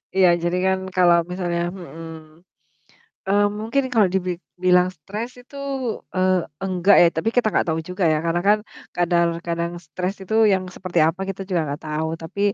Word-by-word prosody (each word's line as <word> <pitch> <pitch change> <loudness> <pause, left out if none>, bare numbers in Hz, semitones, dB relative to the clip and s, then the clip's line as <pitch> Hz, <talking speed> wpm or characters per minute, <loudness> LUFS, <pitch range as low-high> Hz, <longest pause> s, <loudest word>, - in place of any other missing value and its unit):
Iya, 190 -1 +6 0.2
jadi 175 +1 0
kan 190 0 +2 0.2
kalau 175 -2 +5
misalnya 175 -2 -2
mhm. 165 -3 -11 0.9
Eee, 205 +1 +4
mungkin 230 +6 0
kalau 220 -4 +5
dibik 180 -2 -1 0.3
bilang 180 0 +5
stres 210 +9 -6
itu, 270 +3 -15 0.6
eee, 185 -1 +2 0.2
enggak 190 +1 +3
ya, - - +7
tapi 165 +7 0
kita 245 - +3
gak - - +2
tau 160 0 0
juga 180 +1 -2
ya, 155 - +2
karena 170 +1 +1
kan 210 +1 +5 0.4
kadar 175 -1 +3 0.2
kadang 170 0 -2
stres 180 +6 -3
itu 190 +3 -4 0.2
yang 190 -1 +1
seperti 180 -1 -3
apa 165 +4 +1
kita 195 0 -4
juga 180 -4 +1
gak 150 - -12
tau, 155 +1 -1
tapi 165 +5 -7
180 Hz, 170 wpm, -22 LUFS, 170-190 Hz, 0.9 s, ya